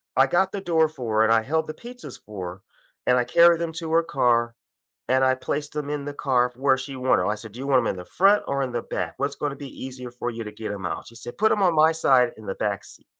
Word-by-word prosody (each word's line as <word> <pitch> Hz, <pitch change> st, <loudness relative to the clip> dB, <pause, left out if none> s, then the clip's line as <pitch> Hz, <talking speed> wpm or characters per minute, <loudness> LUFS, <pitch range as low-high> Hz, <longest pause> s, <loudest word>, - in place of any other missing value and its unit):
I -, -, +6 dB
got 190 Hz, +2 st, +1 dB
the 200 Hz, -, -3 dB
door 165 Hz, -4 st, +3 dB
for 125 Hz, -8 st, -5 dB
her 110 Hz, -, +5 dB
and 115 Hz, -, +4 dB
I 115 Hz, -, +4 dB
held 160 Hz, +7 st, -1 dB
the 155 Hz, -, -5 dB
pizzas 245 Hz, +6 st, -11 dB
for 95 Hz, -4 st, -6 dB
her 95 Hz, -, -18 dB, 0.5 s
and 125 Hz, -, +5 dB
I 125 Hz, -, +2 dB
carried 170 Hz, +7 st, +5 dB
them 165 Hz, -1 st, -3 dB
to 165 Hz, -1 st, -5 dB
her 165 Hz, +1 st, +4 dB
car 120 Hz, -6 st, +1 dB, 0.5 s
and 130 Hz, +1 st, +3 dB
I 130 Hz, 0 st, +3 dB
placed 145 Hz, +3 st, -4 dB
'em 145 Hz, -1 st, -3 dB
in 145 Hz, -1 st, -3 dB
the 145 Hz, 0 st, -5 dB
car 125 Hz, -3 st, +1 dB
where 135 Hz, +1 st, +3 dB
she 135 Hz, +1 st, -7 dB
wanted, 130 Hz, 0 st, +2 dB
I 105 Hz, -, 0 dB
said 110 Hz, 0 st, -11 dB
do 120 Hz, -, -9 dB
you 135 Hz, -, -5 dB
want 135 Hz, -2 st, +5 dB
'em -, -, -3 dB
in -, -, -1 dB
the 90 Hz, -, -8 dB
front 200 Hz, -, +3 dB
or 140 Hz, 0 st, 0 dB
in 130 Hz, -, -5 dB
the 120 Hz, -1 st, -2 dB
back, 85 Hz, -2 st, -4 dB
what's 140 Hz, +1 st, -2 dB
gonna 145 Hz, -2 st, -2 dB
be 140 Hz, -2 st, -9 dB
easier 125 Hz, -1 st, -7 dB
for 120 Hz, 0 st, -4 dB
you 115 Hz, 0 st, -5 dB
to 105 Hz, -, -7 dB
get 105 Hz, 0 st, -6 dB
'em 95 Hz, -3 st, -5 dB
out, -, -, -4 dB
she 115 Hz, -, -14 dB
said 120 Hz, +1 st, -10 dB
put 220 Hz, +1 st, +4 dB
'em 205 Hz, -, +1 dB
on 180 Hz, -2 st, +4 dB
my 155 Hz, +1 st, +6 dB
side 130 Hz, -6 st, +3 dB
in 110 Hz, -, -12 dB
the 95 Hz, -, -4 dB
back 100 Hz, -2 st, -2 dB
seat, -, -, -17 dB
130 Hz, 290 wpm, -24 LUFS, 115-155 Hz, 0.5 s, I